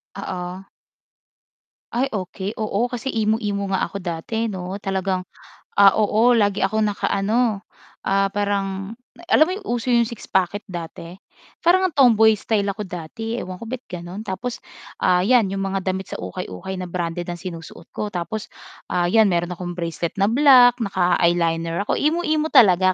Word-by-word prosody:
Oo. 185 -1 -6 1.2
Ay, 260 +3 0
okey, 190 -1 -4
oo. 220 +2 -1
Kasi 245 +1 -5
emo-emo 215 -2 0
nga 190 - +1
ako - - -7
dati, 180 +7 -2
'no. 185 0 -5
Talagang, 190 -2 -1 0.6
ah, 200 -1 +7
oo, 220 +3 +3
lagi 205 -3 +2
akong 215 +3 +1
naka-ano, 210 +1 0 0.4
ah, 195 0 +2
parang 200 0 -2 0.4
alam 310 - +7
mo - - -1
'yong 405 - -10
uso 240 0 -2
'yong 235 -1 +4
six 235 -1 -9
pocket 190 +2 +1
dati. 170 0 -7 0.5
Para 345 +2 +5
ngang 375 -3 0
tomboy-style 220 -5 +4
ako 210 - -7
dati, 190 +7 -5
ewan 185 -5 -6
ko 230 - -6
ba't 255 -1 -4
gano'n. 180 +2 -7
Tapos, 230 +5 -4 0.4
ah, 180 -1 +3
'yan 235 -3 +4
'yong 195 0 -3
mga 195 0 -1
damit 190 0 -2
sa - - -3
ukay-ukay 90 - -6
na - - -4
branded 175 0 -3
ang 175 - -4
sinusuot 170 -2 -9
ko. 210 - -3
Tapos, 195 +5 -4 0.4
ah, 175 - +1
'yan 220 +3 +5
mayro'n 175 -1 0
akong 175 0 -6
bracelet 170 -1 -3
na - - +5
black, 250 -1 +6
naka-eyeliner 170 -3 +1
ako. - - 0
Emo-emo 310 0 +1
talaga 185 -3 +6
195 Hz, 155 wpm, -22 LUFS, 180-225 Hz, 1.2 s, ah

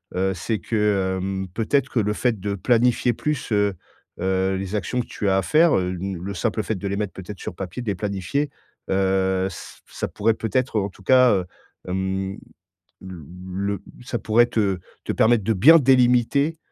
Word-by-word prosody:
Heu, 95 +1 +1
c'est 105 +5 -2
que, 100 -1 0
hem, 95 0 -3
peut-être 130 +5 +1
que 120 - 0
le 105 -1 +1
fait 115 -1 0
de 100 +1 -2
planifier 120 +3 +2
plus, 150 0 -3
heu 100 -1 +2 0.5
heu, 95 +1 +1
les 95 +2 -4
actions 105 +5 -1
que - - -9
tu 105 - -3
as 95 - +3
à - - +2
faire, 155 - +4
heu, 90 -1 0
une 95 0 -4
le 100 +1 -4
simple 110 +2 -1
fait 110 - -2
de 100 +1 -4
les 100 - -2
mettre 105 -2 -3
peut-être 95 +1 -9
sur - - -6
papier, 95 +4 -6
de 120 - -9
les - - -3
planifier. 100 +9 -2 0.4
Heu, 95 0 +1
ç 85 - -11
ça - - -4
pourrait 110 +2 0
peut-être 115 +1 -1
en 100 0 -2
tout 95 - -18
cas, 125 +3 +6
heu, 95 -3 0 0.4
hem, 95 +1 -2 0.6
l 95 0 -8 0.4
le 100 +1 -2 0.2
ça 120 -1 -3
pourrait 120 +2 +3
te 100 -6 0 0.3
te - - -1
permettre 110 -1 +3
de 110 - +2
bien 150 - +7
délimiter, 130 +3 +3
100 Hz, 195 wpm, -23 LUFS, 95-120 Hz, 0.6 s, bien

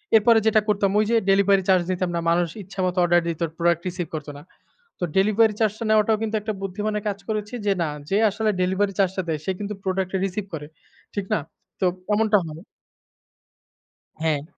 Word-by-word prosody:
এরপরে 225 +1 +6
যেটা 215 0 +4
করতাম 200 -2 +2
ওইযে 215 +2 +2
ডেলিভারি 195 0 +4
চার্জ 185 -2 +5
দিতাম 185 0 -1
না। 170 - 0
মানুষ 170 +1 +2 0.2
ইচ্ছামত 185 -1 -2
অর্ডার 175 0 +4
দিত, 165 -1 -3 0.2
প্রোডাক্ট 170 -1 +2
রিসিভ 180 -1 -3
করতো 150 -1 -5
না। - - -14 0.6
তো - - -4
ডেলিভারি 215 +2 +4
চার্জটা 220 0 0
নেওয়াটাও 215 0 +4
কিন্তু 220 0 -1
একটা 215 +1 -3
বুদ্ধিমানের 210 +2 -3
কাজ 200 - -3
করেছি 210 +1 -3
যে 200 - +3
না। 160 - -1 0.2
যে 195 - +2
আসলে 215 +2 -1
ডেলিভারি 190 +2 +1
চার্জটা 190 -1 +1
দেয় 155 -2 -1
সে 190 - 0
কিন্তু 205 0 -4
প্রোডাক্টটা 190 0 -1
রিসিভ 195 +1 -3
করে। 150 -2 -5 0.5
ঠিক 200 -2 -2
না? - - +2 0.4
তো - - +3 0.3
এমনটা 215 0 +4
হয়। 160 +2 -9 1.6
হ্যাঁ। 155 -3 0
195 Hz, 175 wpm, -23 LUFS, 180-210 Hz, 1.6 s, এরপরে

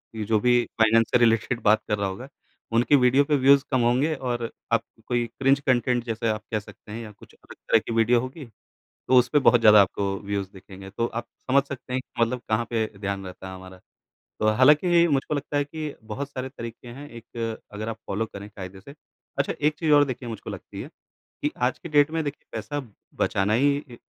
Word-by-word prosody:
ये 110 - -3
जो 110 0 +2
भी 120 +1 +3 0.2
फाइनेंस 115 +1 +5
से - - +5
रिलेटेड 120 +1 +2
बात 110 +1 +4
कर 105 - 0
रहा 100 -1 -1
होगा, 110 +8 -6 0.4
उनके 120 +5 +4
वीडियो 130 +1 +4
पे 150 +1 +1
व्यूज़ 135 +1 +5
कम 130 - +2
होंगे, 125 +7 +2
और 120 -4 -3 0.2
आप 115 -1 +2 0.2
कोई 120 -1 +1
क्रिंज 135 +1 +4
कॉन्टेंट 125 -3 +1
जैसे 115 0 -2
आप 110 0 -2
कह 110 - +1
सकते 105 0 -14
हैं 115 +2 -5
या 105 - -9
कुछ 105 - -18
अलग - - -15
तरह 115 - +2
की 115 - -6
वीडियो 115 +2 +4
होगी, 130 +4 -7 0.4
तो 130 - 0
उस 125 - +1
पे 145 - +6
बहुत 125 -3 +5
ज़्यादा 105 -2 +8
आपको 100 0 -1
व्यूज़ 100 -1 -3
दिखेंगे। 95 0 -12
तो 115 - -2
आप 115 0 -5 0.2
समझ 135 +1 +5
सकते 130 -2 -7
हैं 130 - +1
कि 125 - -7
मतलब 125 +2 -2
कहाँ 110 +2 +1
पे 115 -2 0
ध्यान 100 -1 -3
रहता 95 +1 -9
है 95 - -8
हमारा। 95 0 -12 0.6
तो 110 - +1
हालाँकि, 150 - +5
मुझको 145 0 0
लगता 145 +1 -2
है 145 - +2
कि 155 0 -6
बहुत 140 +5 -5
सारे 130 -2 -5
तरीके 115 -2 -9
हैं 140 +5 -9
एक 115 -1 -6 0.2
अगर 110 +2 -4
आप 115 - -5
फ़ॉलो 105 +3 -1
करें 100 -1 -10
कायदे 95 -1 -8
से। 125 - -12 0.5
अच्छा, 140 - 0
एक 150 +1 +2
चीज 160 -2 +1
और 145 -1 +7
देखिए 130 -2 -5
मुझको 110 -3 -7
लगती - - -8
है - - -8 0.5
कि 150 - +1 0.2
आज 130 - -3
के 170 - -8
डेट 145 0 +4
में 160 0 -1
देखिए 145 -1 -6
पैसा 145 0 -4 0.4
बचाना 100 +2 +1
ही 140 +4 +3
इ 135 -4 -10
120 Hz, 220 wpm, -25 LUFS, 110-140 Hz, 0.6 s, ज़्यादा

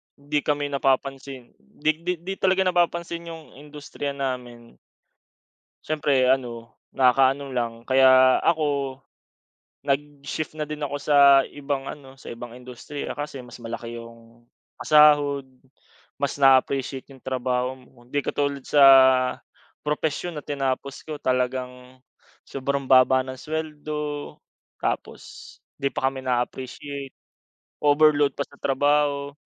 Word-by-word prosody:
'di 145 +1 -2
kami 145 -1 -1
napapansin. 135 -1 -2
'Di 145 - -1
'di 180 +2 -1
'di 190 +2 -3
talaga 190 0 +2
napapansin 170 -1 -1
yung 165 -1 -8 0.2
industriya 145 -1 -7
namin. 125 -3 -6 1.1
Siyempre 140 -4 +2
ano, 120 -3 -3 0.2
nakaka-ano 135 +1 +3
lang. 120 -2 -2
Kaya 130 0 +5
ako, 140 -4 -1 0.8
nag-shift 145 +2 -3
na 150 - -2
din 150 -1 -6
ako 145 0 -3
sa 140 -1 +6
ibang 140 -1 -4
ano, 135 -2 -10
sa - - -14
ibang 120 0 -8
industriya 125 +4 -8
kasi 145 -2 -6
mas 125 -1 -11
malaki 115 +1 -6
yung 115 0 -13 0.3
pasahod. 145 -2 +4 0.7
Mas 140 - -1
na-a-appreciate 135 -1 +2
yung 130 - -21
trabaho 130 0 -2
mo. 125 -1 -21
Hindi 130 +4 -2
katulad 140 0 -2
sa 145 -1 +5 1.0
propesyon 160 +3 -2
na 150 - -6
tinapos 135 -1 -3
ko, 155 - -4
talagang 125 -1 -3 0.4
sobrang 140 +1 -3
baba 130 0 +5
ng 130 0 -8
suweldo. 150 -1 -5 0.5
Tapos - - -5 0.2
'di 140 - 0
pa 135 0 +1
kami 135 - -7
na-a-appreciate, 130 +3 -4 0.7
overload 145 -1 +4
pa 140 - 0
sa 140 - -19
trabaho. 145 +1 +1
140 Hz, 120 wpm, -24 LUFS, 130-145 Hz, 1.1 s, sa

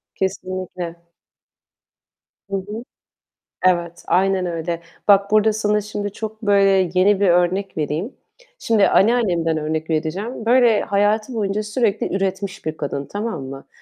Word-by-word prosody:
Kesinlikle. 185 -2 -4 1.6
Hı - - 0
hı. 210 +4 -6 0.8
Evet, 175 -2 +1
aynen 190 0 +2
öyle. 170 0 -3 0.3
Bak, 200 0 +5
burada 215 0 +4
sana 210 -1 +1
şimdi 205 0 -4
çok 220 +1 -6
böyle 195 -3 +3
yeni 190 +2 +4
bir 200 - +3
örnek 180 +3 +1
vereyim. 155 - -2 0.4
Şimdi 220 - +3
anneannemden 185 -8 +2
örnek 155 +1 -3
vereceğim. 185 +9 -2
Böyle 240 -2 +4
hayatı 210 +4 +1
boyunca 210 -1 -1
sürekli 215 -2 -1
üretmiş 195 0 -3
bir 155 0 -3
kadın, 140 -1 -3
tamam 205 0 -4
mı? 135 +1 -9
195 Hz, 125 wpm, -21 LUFS, 175-210 Hz, 1.6 s, Bak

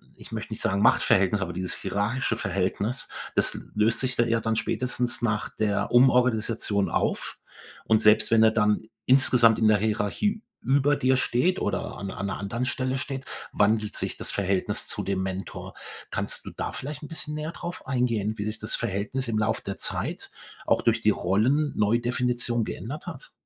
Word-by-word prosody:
ich - - -13
möchte - - -5
nicht - - -6
sagen 100 +1 +1
Machtverhältnis, 100 0 +4
aber 90 -1 -3
dieses 90 +1 -2
hierarchische 115 +4 -1
Verhältnis, 100 +7 -1 0.3
das - - +3 0.2
löst 110 +2 +2
sich 130 -1 0
da 120 - +4
eher 115 0 +1
dann 110 0 0
spätestens 125 +2 -1
nach 105 -3 0
der 105 -2 -1
Umorganisation 115 -5 +3
auf. - - -1 0.5
Und 110 -1 +3
selbst 105 +1 +5
wenn 110 -1 +6
er 110 - +6
dann 105 -1 +2 0.2
insgesamt 125 -3 +5
in 110 - +4
der 105 - +5
Hierarchie 110 - -1 0.2
über 140 +2 +3
dir 130 -1 +2
steht 170 +10 +1
oder 100 - -2
an 100 -1 -5
an 100 - -5
'ner 95 - -3
anderen 115 +5 -2
Stelle 130 0 -1
steht, 135 0 -5 0.3
wandelt 105 0 +1
sich - - -3
das - - -2
Verhältnis 95 -1 -1
zu - - -3
dem 95 -1 -1
Mentor. 95 0 -6 0.4
Kannst - - -3
du - - -5
da - - -4
vielleicht 150 +3 -6
'n - - -6
bisschen 150 -2 -5
näher 155 +1 -4
drauf 175 -4 -7
eingehen, 115 -5 0
wie 100 - -2
sich 110 +1 -4
das 110 - 0
Verhältnis 115 +4 -2
im 110 - 0
Lauf 110 +1 0
der 100 - -5
Zeit - - -3 0.4
auch - - +2
durch 115 0 +2
die 105 -1 +4
Rollen-Neudefinition 120 +2 +1
geändert 140 +9 -6
hat? - - -8
115 Hz, 175 wpm, -26 LUFS, 105-130 Hz, 0.5 s, wenn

